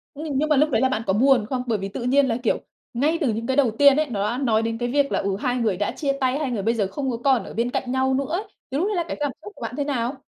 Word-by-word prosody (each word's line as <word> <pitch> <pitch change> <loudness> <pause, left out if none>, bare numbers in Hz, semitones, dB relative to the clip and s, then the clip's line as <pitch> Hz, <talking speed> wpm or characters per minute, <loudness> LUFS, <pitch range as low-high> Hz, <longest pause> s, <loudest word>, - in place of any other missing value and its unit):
Nhưng 295 -2 -3
nhưng 305 +3 +1
mà 300 - +4
lúc 300 +3 +3
đấy 235 - +1
là 260 - +3
bạn 220 -4 -1
có 190 - +2
buồn 250 +1 +4
không? 255 -2 -2
Bởi 225 -3 +1
vì 195 0 -4
tự 220 - -6
nhiên 270 +3 +3
là, 230 -2 0
kiểu, 230 - +1 0.3
ngay 295 +7 +1
từ 255 -7 +1
những 230 +2 -4
cái 265 - 0
đầu 265 -5 +4
tiên 280 -1 +7
ấy, 305 -1 +1
nó 200 -4 -2
đã 240 - -3
nói 220 -3 +2
đến 225 0 -2
cái 240 +1 -2
việc 280 +1 +1
là, - - +1
ừ, 195 -1 -1
hai 250 0 0
người 220 -6 0
đã 205 +1 -1
chia 280 -3 -1
tay, 260 +2 +1
hai 285 -4 -2
người 210 -5 -2
bây 225 +3 +2
giờ 210 -4 0
không 265 +7 -3
có 235 - -3
còn 265 -6 +3
ở - - -9
bên 235 +2 0
cạnh 250 0 -2
nhau 260 0 +1
nữa 275 +1 0
ấy. 360 +5 -1 0.3
Thì 270 - -1
lúc 350 +7 +1
đấy 425 - -1
là 345 - +1
cái - - -4
cảm 290 -2 0
xúc 415 - -9
của - - -16
bạn - - -4
thế 290 - 0
nào? 265 -2 -2
260 Hz, 350 wpm, -23 LUFS, 230-285 Hz, 0.3 s, tiên